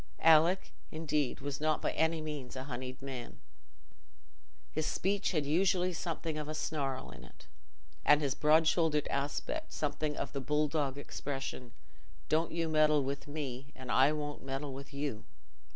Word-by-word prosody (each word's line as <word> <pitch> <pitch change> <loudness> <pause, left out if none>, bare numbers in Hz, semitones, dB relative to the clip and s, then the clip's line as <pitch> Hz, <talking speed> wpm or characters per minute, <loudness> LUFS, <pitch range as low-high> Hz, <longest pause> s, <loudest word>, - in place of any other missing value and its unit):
Alick, 165 +4 +5 0.2
indeed, 150 -5 -1
was 140 0 -4
not 155 0 +2
by - - 0
any 160 0 +1
means 150 -5 -5
a 130 - -4
honeyed 130 0 -6
man. 130 -3 -6 1.3
His 155 0 -1
speech 195 +2 0
had 155 -5 0
usually 180 +4 +2
something 165 -2 -3
of 150 - -4
a 155 - -3
snarl 135 - -2
in 70 -1 -11
it, 60 - -15 0.6
and 150 - +6
his 140 -3 0
broad 155 +2 +4
shouldered 160 -3 +2
aspect 150 - -2
something 150 0 -2
of - - -3
the 140 - -2
bull 150 +3 +2
dog 145 -3 -1
expression—"Don't 140 +3 -4
you 165 0 0
meddle 155 -2 +4
with 140 +2 -4
me, 140 -2 -5
and 130 -1 -6
I 135 +3 +6
won't 145 -1 -4
meddle 135 +1 -3
with 140 +1 -8
you." 140 -6 -3
150 Hz, 155 wpm, -33 LUFS, 135-155 Hz, 1.3 s, and